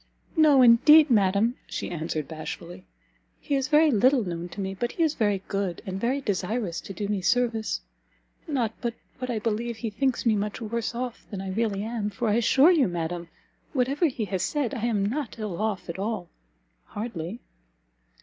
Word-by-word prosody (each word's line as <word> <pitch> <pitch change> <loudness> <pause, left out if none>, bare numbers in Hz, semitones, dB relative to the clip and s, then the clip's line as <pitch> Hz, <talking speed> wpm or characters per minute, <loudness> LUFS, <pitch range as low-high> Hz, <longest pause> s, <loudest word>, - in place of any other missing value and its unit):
"No 300 -5 +6
indeed, 290 +6 +7
madam," 205 +3 +3
she - - -4
answered, 160 -3 -3
bashfully, 170 +3 -7 0.5
"he 290 - -4
is 270 -1 +1
very 305 +1 +5
little 255 +3 +4
known 175 -2 -5
to 205 - -10
me; 190 -1 -2
but 240 +5 -3
he 335 - +1
is 310 -2 +2
very 205 -6 0
good, 195 -4 -2
and 190 0 -4
very 260 +4 0
desirous 200 -3 -2
to - - -9
do 200 +2 -3
me 205 -2 -1
service: 230 +1 +1 0.7
not 245 -8 0
but 235 -2 -2 0.2
what 255 0 -4
I 235 - -1
believe 230 +2 -2
he 225 -1 -4
thinks 260 +4 0
me 225 -2 +4
much 210 0 -2
worse 235 +1 -3
off 245 -1 -5
than 200 - -5
I 190 0 -4
really 205 -1 -1
am, 220 -2 -2
for, 230 +2 -2
I - - +3
assure 265 +7 +5
you, 310 - +4
madam, 170 0 -3 0.5
whatever 275 +5 +2
he 245 -6 -3
has 190 -2 -2
said, 275 - -1
I 235 -3 -2
am 205 -4 +1
not 245 +3 -3
ill 210 -4 -4
off 215 -3 -2
at 170 +2 -5
all 200 -4 -3 0.6
hardly." 205 -2 -5
220 Hz, 190 wpm, -26 LUFS, 195-250 Hz, 0.7 s, indeed